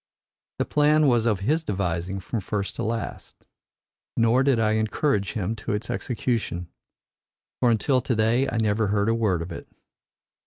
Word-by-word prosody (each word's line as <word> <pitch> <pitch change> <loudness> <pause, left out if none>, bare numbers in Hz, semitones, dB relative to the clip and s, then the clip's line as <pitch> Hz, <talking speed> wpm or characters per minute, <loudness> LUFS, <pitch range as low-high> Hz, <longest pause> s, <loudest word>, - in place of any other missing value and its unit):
"The - - 0
plan 150 +1 +3
was 120 -4 +3
of 105 -4 +1
his 155 +10 +1
devising 95 - -2
from 115 +5 -3
first 100 +1 -3
to - - -2
last. 115 +1 -4 0.8
Nor 115 +2 +4
did 135 -3 +3
I 110 -1 +2
encourage 110 0 0
him 105 +1 -2
to 110 -1 -3
its 105 +2 -3
execution. 115 -8 -2 0.9
For 125 - +3
until 125 +4 +2
to 125 -1 -1
day 115 +5 +2
I 115 - -2
never 110 -1 +1
heard 100 +1 +1
a - - +3
word 105 -7 +1
of 85 - -9
it. - - -8
110 Hz, 165 wpm, -25 LUFS, 100-120 Hz, 0.9 s, Nor